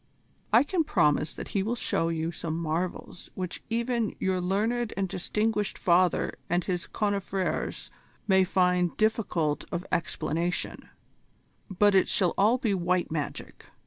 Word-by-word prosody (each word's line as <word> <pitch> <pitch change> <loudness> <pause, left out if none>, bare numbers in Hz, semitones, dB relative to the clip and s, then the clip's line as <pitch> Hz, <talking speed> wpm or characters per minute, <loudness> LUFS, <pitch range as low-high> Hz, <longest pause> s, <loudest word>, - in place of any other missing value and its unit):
"I 230 +4 +6
can 330 +3 0
promise 150 - +2
that - - -7
he 200 - 0
will 225 +5 -1
show 165 -7 0
you 165 0 -1
some 160 -1 -4
marvels 170 +2 -3
which 180 -2 -5
even 235 -1 -1
your 185 -1 0
learned 220 +6 0
and 195 -1 0
distinguished 210 +3 -1
father 180 0 +2
and 175 +1 +1
his 180 -3 -2
confrères 200 -2 -2 0.4
may 190 -2 +5
find 180 -1 +1
difficult 195 -9 0
of 175 +2 -3
explanation: 165 +1 -2 0.8
but 205 +2 +3
it 190 - +4
shall 180 -4 +2
all 215 +5 +4
be 235 -5 0
white 180 -2 0
magic. 150 -3 -5
185 Hz, 140 wpm, -28 LUFS, 175-210 Hz, 0.8 s, I